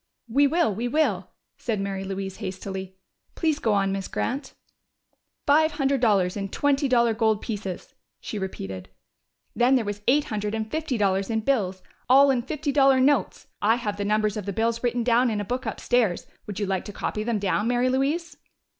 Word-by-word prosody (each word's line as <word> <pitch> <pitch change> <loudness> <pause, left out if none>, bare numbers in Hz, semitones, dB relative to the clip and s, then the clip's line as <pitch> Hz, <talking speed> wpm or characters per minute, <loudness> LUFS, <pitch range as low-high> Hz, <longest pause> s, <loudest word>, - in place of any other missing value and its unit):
"We 280 +5 +4
will 320 -6 +2
We 230 +5 -2
will!" 240 - 0 0.3
said 225 -4 -2
Mary 195 -1 -3
Louise 195 0 -5
hastily. 190 -1 -6 0.4
"Please 315 -3 0
go 220 -7 +1
on, 195 -1 +2
Miss 195 -1 -3
Grant!" 265 +2 -3 0.9
"Five 310 +2 +4
hundred 275 -3 0
dollars 195 -6 +3
in 195 -1 -3
twenty 285 +5 +1
dollar 235 -3 +3
gold 220 -1 +2
pieces," 205 -6 -6 0.3
she 210 - -5
repeated. 95 - -6 0.7
"Then 245 +2 +4
there 245 -4 +1
was 205 0 -4
eight 285 +4 +4
hundred 210 -5 -3
and 220 0 -4
fifty 315 -5 -1
dollars 195 -1 +1
in 220 -1 0
bills 195 -7 0 0.3
all 275 +2 +7
in 250 -2 +1
fifty 295 +3 -3
dollar 270 -1 +5
notes. 260 -6 +2 0.2
I 220 +2 +4
have 210 -4 -3
the 205 - -2
numbers 215 0 +1
of 205 -2 -5
the 200 - -2
bills 230 +3 0
written 240 0 0
down 245 +1 +3
in 215 -2 -1
a 205 - -3
book 250 +5 -3
upstairs. 230 -8 0 0.2
Would 205 -1 -5
you 205 - 0
like 190 -1 -2
to - - -6
copy 210 - -3
them 230 0 0
down, 205 +2 0
Mary 245 +1 +2
Louise?" 285 +7 -1
225 Hz, 190 wpm, -25 LUFS, 200-265 Hz, 0.9 s, all